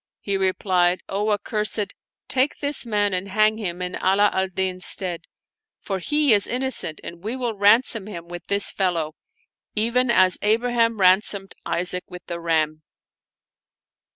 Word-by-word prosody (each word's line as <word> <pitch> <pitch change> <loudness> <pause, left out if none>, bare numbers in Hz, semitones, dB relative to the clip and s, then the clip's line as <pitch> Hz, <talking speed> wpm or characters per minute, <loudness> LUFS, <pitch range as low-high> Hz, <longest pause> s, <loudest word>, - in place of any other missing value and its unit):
He 200 - -2
replied, 185 -2 +1
" - - -47
O 210 +1 0
accursed, 210 0 -1 0.3
take 265 +2 +1
this 285 -3 -2
man 205 -2 +1
and 185 +1 -1
hang 215 +2 +2
him 180 -3 -4
in 180 0 -4
Ala 200 +2 +3
al 190 0 +1
Din's 185 -1 -3
stead; 180 -3 0 0.5
for 195 -2 -4
he 295 - +2
is 205 -1 +2
innocent 250 -10 -2
and 170 +1 -9
we 220 +4 -3
will 245 -3 -2
ransom 210 +1 +3
him 170 -5 -8
with 175 0 -9
this 200 0 0
fellow, 170 -5 -1 0.6
even 235 +3 +1
as 185 -5 +4
Abraham 230 +1 +2
ran 185 +1 +6
somed 195 -2 -5
Isaac 180 +1 -1
with 180 0 -10
the 170 -1 -5
ram." 155 -2 0
200 Hz, 155 wpm, -23 LUFS, 180-220 Hz, 0.6 s, ran